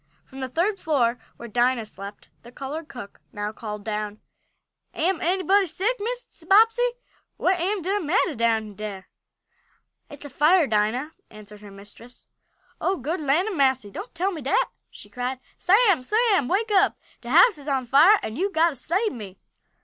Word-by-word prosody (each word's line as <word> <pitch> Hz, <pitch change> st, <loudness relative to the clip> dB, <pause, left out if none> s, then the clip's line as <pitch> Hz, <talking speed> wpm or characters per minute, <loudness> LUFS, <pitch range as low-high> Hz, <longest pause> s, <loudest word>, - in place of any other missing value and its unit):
From 270 Hz, -, -12 dB
the 260 Hz, -1 st, -4 dB
third 375 Hz, -, 0 dB
floor, 250 Hz, -6 st, +1 dB, 0.2 s
where 235 Hz, -, -9 dB
Dinah 240 Hz, +1 st, +1 dB
slept, 200 Hz, -1 st, -10 dB
the 240 Hz, -, -14 dB
colored 290 Hz, +5 st, -6 dB
cook 235 Hz, -8 st, -11 dB
now 205 Hz, 0 st, -4 dB
called 210 Hz, -2 st, -7 dB
down: 210 Hz, -1 st, -4 dB, 0.8 s
"Am 345 Hz, +1 st, 0 dB
anybody 380 Hz, +2 st, +2 dB
sick, 420 Hz, +9 st, -1 dB
Mrs. 465 Hz, -6 st, -6 dB
Bobbsey? 455 Hz, +4 st, +5 dB, 0.5 s
What 365 Hz, 0 st, +1 dB
am 380 Hz, +2 st, -1 dB
de 390 Hz, +4 st, 0 dB
mattah 335 Hz, 0 st, +1 dB
down 225 Hz, -2 st, 0 dB
dere?" 200 Hz, -2 st, -7 dB, 1.0 s
"It's 290 Hz, 0 st, -11 dB
a -, -, -7 dB
fire, 315 Hz, +5 st, +4 dB
Dinah!" 225 Hz, +6 st, 0 dB, 0.2 s
answered 210 Hz, -1 st, -13 dB
her 205 Hz, -, -11 dB
mistress. 205 Hz, +5 st, -14 dB, 0.6 s
"Oh 380 Hz, +1 st, 0 dB
good 310 Hz, +7 st, -3 dB
land 305 Hz, +8 st, +2 dB
a'massy! 265 Hz, -, +1 dB
Don't 385 Hz, -, -8 dB
tell 370 Hz, +4 st, 0 dB
me 325 Hz, -5 st, -6 dB
dat!" 270 Hz, -, +1 dB, 0.2 s
she -, -, -13 dB
cried. 250 Hz, +1 st, -4 dB, 0.2 s
"Sam! 395 Hz, -, +4 dB
Sam! 415 Hz, -, +2 dB
Wake 430 Hz, -, 0 dB
up. 400 Hz, 0 st, +3 dB, 0.2 s
De 235 Hz, -, -9 dB
house 355 Hz, -, +5 dB
is 285 Hz, -, -13 dB
on 265 Hz, -3 st, 0 dB
fire 305 Hz, -, +6 dB
an' 220 Hz, -, -5 dB
you'se 390 Hz, +2 st, -1 dB
got 330 Hz, 0 st, +4 dB
t' 305 Hz, -, -8 dB
sabe 375 Hz, -, -1 dB
me!" 200 Hz, -6 st, -9 dB
290 Hz, 170 wpm, -24 LUFS, 230-380 Hz, 1.0 s, fire